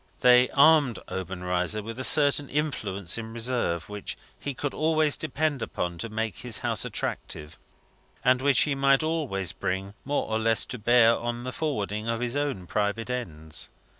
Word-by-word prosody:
They 125 0 +6
armed 145 - +5
Obenreizer 90 +2 -2
with 115 +3 -7
a - - -3
certain 145 +1 +4
influence 110 - -1
in 110 -1 -7
reserve, 115 -9 -1
which 105 -1 -6 0.2
he 140 -2 -5
could 145 +1 -3
always 155 -1 +2
depend 155 -3 -2
upon 85 -5 -3
to 115 - -3
make 110 -2 -3
his 120 -4 -1
house - - -1
attractive, 75 -1 -4 0.7
and 130 0 +4
which 140 -2 +4
he 150 - +2
might 135 +1 +3
always 145 - -1
bring 95 +2 -3
more 145 +1 -1
or 110 0 -1
less 115 0 +3
to 125 - -7
bear 115 +1 +5
on 120 +1 -4
the 125 - -4
forwarding 110 -7 -3
of 115 0 -1
his 120 +1 -2
own 140 -11 -2
private 105 +5 -1
ends. 80 -11 -4
120 Hz, 165 wpm, -26 LUFS, 100-140 Hz, 0.7 s, They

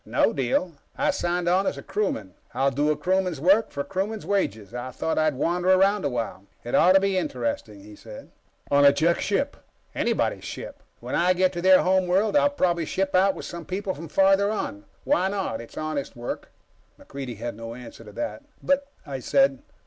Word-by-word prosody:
"No - - +1
deal. 135 +7 0 0.3
I - - +2
signed 175 0 -1
on 185 +2 +3
as - - -1
a 140 - -8
crewman. 115 - -2 0.2
I'll 135 +1 +2
do 145 +3 +1
a 150 - +1
crewman's 185 -4 0
work 195 +8 +4
for 140 - -4
a - - -2
crewman's 195 +4 -3
wages. 110 - -1
I 125 +1 -5
thought 145 +6 -2
I'd 155 -2 +2
wander 175 +6 0
around 195 +1 +4
a - - +2
while. 115 -5 -4 0.2
It 120 - -6
ought 185 - +6
to 195 - +7
be 195 -1 +1
interesting," 115 - -3
he 105 0 -12
said. 110 0 -12 0.4
"On 140 0 +5
a 140 - +8
Jek 165 +4 +1
ship." 275 +9 -1 0.4
"Anybody's - - 0
ship. - - -8 0.2
When - - -6
I 180 +2 +3
get 185 0 +2
to 175 - -4
their 185 +1 +6
home 185 0 +2
world, 195 +6 +2
I'll 285 0 +5
probably 175 - 0
ship 190 +4 -1
out 190 +1 +4
with - - -7
some 170 -1 -7
people 190 +2 -3
from 165 +1 -8
farther 195 +4 +3
on. 285 +7 -4 0.2
Why 235 -10 +2
not? 190 - -2
It's 115 - -13
honest 155 -3 -3
work." 120 0 -6 0.5
MacReidie 135 -5 -7
had 120 +1 -5
no 115 +1 -7
answer 125 -2 -11
to - - -12
that. 295 -1 -4 0.2
"But 280 0 +1
" - - -33
I 140 -3 -5
said. 275 - +2
175 Hz, 210 wpm, -25 LUFS, 135-195 Hz, 0.5 s, a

